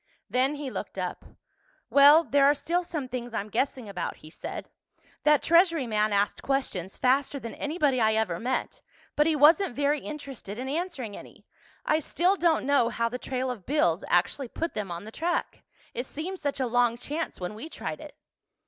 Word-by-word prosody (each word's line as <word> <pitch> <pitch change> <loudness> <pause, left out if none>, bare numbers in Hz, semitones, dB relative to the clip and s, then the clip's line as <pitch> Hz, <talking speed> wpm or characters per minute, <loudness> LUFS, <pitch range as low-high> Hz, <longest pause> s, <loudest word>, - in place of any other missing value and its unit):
Then 260 +3 +2
he 285 -3 -5
looked - - -6
up. - - -4 0.7
"Well, 290 +3 +8
there 280 0 +3
are 290 - +5
still 345 +5 -1
some 310 -6 -4
things 245 -2 -5
I'm 205 - -3
guessing 260 -2 -1
about," 185 -4 -4
he 155 - -14
said. - - -7 0.6
"That 300 -1 +5
Treasury 335 -4 +4
man 215 -2 +1
asked 200 0 +1
questions 200 -10 -2
faster 275 +2 +2
than 230 -4 -7
anybody 290 -5 0
I 220 0 +3
ever 210 -6 0
met—but 260 +4 -2
he 320 - +2
wasn't 300 0 +5
very 290 +1 +1
interested 275 -9 -7
in 255 +2 -4
answering 285 - -3
any. - - -13 0.4
I 310 - +3
still 350 +5 +1
don't 340 -6 +2
know 275 -4 +3
how 230 0 -1
the 250 +2 -5
trail 255 0 -2
of 215 -7 -9
bills 200 - +2
actually 180 +10 +1
put 330 +7 -4
them 205 -3 -4
on 170 +1 -5
the 215 - -9
track. 345 +7 -2 0.3
It 245 +2 -4
seemed 360 +5 -5
such 285 -1 -2
a 260 - +1
long 240 -1 +2
chance 300 +6 -4
when 180 +2 -4
we 230 +10 -8
tried - - -6
it." - - -11
270 Hz, 185 wpm, -27 LUFS, 230-300 Hz, 0.7 s, Well